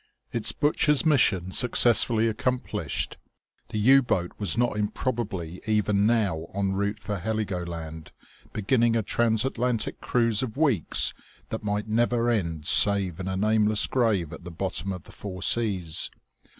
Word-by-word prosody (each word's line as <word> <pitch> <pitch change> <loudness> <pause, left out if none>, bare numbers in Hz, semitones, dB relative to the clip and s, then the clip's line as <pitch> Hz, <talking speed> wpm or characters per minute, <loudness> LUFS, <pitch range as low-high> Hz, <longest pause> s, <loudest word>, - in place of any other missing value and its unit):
Its 115 -2 -1
butcher's 150 0 +2
mission 100 - +2
successfully 115 -1 +3
accomplished, 125 +3 -2 0.5
the - - -5
U 130 +6 +6
boat 90 -8 -1
was 105 +1 0
not 120 -2 +1
improbably 105 -5 -3
even 105 -1 +2
now 100 -9 0
en 100 -1 0
route 100 +2 -1
for 105 -2 -5
Heligoland, 85 -6 -4 0.4
beginning 115 +2 +1
a 115 - +1
transatlantic 120 +1 0
cruise 115 -3 +1
of 130 -1 -5
weeks 135 - +1 0.4
that 110 - -4
might 105 0 -2
never 120 +2 +1
end 85 -9 -2
save 95 -2 +4
in 95 - -5
a 95 0 -2
nameless 105 +1 +2
grave 105 - 0
at 80 - -10
the 90 - -8
bottom 95 +2 -2
of 90 -3 -6
the - - -15
Four 95 -3 -7
Seas. 95 -8 +1
105 Hz, 140 wpm, -26 LUFS, 95-120 Hz, 0.5 s, U